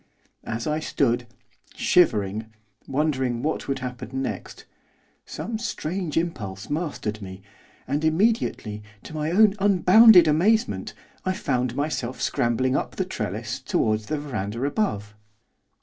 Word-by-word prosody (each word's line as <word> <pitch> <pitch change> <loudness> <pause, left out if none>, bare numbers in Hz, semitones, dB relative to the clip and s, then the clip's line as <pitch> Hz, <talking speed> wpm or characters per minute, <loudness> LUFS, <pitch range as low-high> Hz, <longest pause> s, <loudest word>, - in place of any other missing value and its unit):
As 115 +1 -3
I 150 0 0
stood, 120 -5 0 0.5
shivering, 110 - +2 0.4
wondering 130 -4 0
what 155 +1 -2
would 135 - -1
happen 125 +1 -5
next, - - -6 0.6
some 225 -1 -5
strange 175 -7 -3
impulse 110 - -3
mastered 145 -9 -3
me, 95 -1 -9 0.4
and, 145 +3 -1
immediately, 160 - +1 0.2
to - - -10
my 155 0 -2
own 200 +3 +5
unbounded 195 0 +7
amazement, 210 +10 +1 0.3
I 185 - 0
found 125 - -1
myself 140 -3 -2
scrambling 130 +2 +1
up - - -2
the - - -1
trellis - - -4
towards 110 -1 0
the 155 - -1
verandah 115 -5 -4
above. 105 - -1
145 Hz, 120 wpm, -24 LUFS, 115-175 Hz, 0.6 s, unbounded